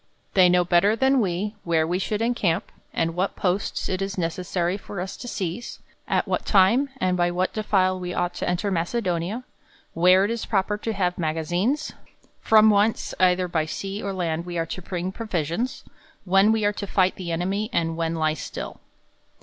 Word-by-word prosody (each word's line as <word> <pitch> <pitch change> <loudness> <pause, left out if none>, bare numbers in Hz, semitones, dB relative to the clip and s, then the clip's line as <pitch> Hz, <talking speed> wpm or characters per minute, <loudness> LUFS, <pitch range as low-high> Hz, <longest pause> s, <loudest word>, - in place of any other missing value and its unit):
They 185 -2 +6
know 180 0 +3
better 180 +5 +4
than 265 +3 +3
we, 195 +2 -1
where 165 -2 +2
we 175 +3 -1
should 210 +3 -1
encamp, 205 -7 0 0.2
and 165 0 -1
what 185 +3 -1
posts 185 +1 -1
it 185 0 -2
is 195 +1 -3
ne 165 -2 +1
cessary 180 0 -2
for 200 -1 -7
us 185 +1 -4
to 245 - -8
sieze; 195 +1 -4 0.3
at - - +1
what - - -1
time, 225 +8 +4
and 185 -3 +1
by 175 -1 +2
what 180 +1 -1
de 215 - -2
file 185 -3 +2
we 180 -1 -4
ought 175 0 -1
to - - -2
enter 180 +3 -1
Macedonia; 180 +3 -1 0.5
where 185 +3 +5
it 210 - -1
is 230 -1 -3
proper 205 0 +1
to 225 +1 -2
have 180 -3 -1
magazines; 175 - -1 0.5
from 220 0 +6
whence, 210 +2 +1
either 180 0 +3
by 160 -3 -1
sea 195 +5 -4
or 200 - -3
land, 170 -3 -2
we 175 -1 -4
are 165 - 0
to 185 - -6
bring 180 0 -4
provisions; 195 - -3 0.4
when 195 +3 +5
we 220 -2 +1
are 205 - +2
tQ 200 -1 -5
fight 185 -1 +2
the 175 -3 -5
enemy, 195 +6 -1
and 165 -4 0
when 165 0 -1
lie 155 -1 +1
still. 155 - -7
185 Hz, 195 wpm, -24 LUFS, 175-205 Hz, 0.5 s, They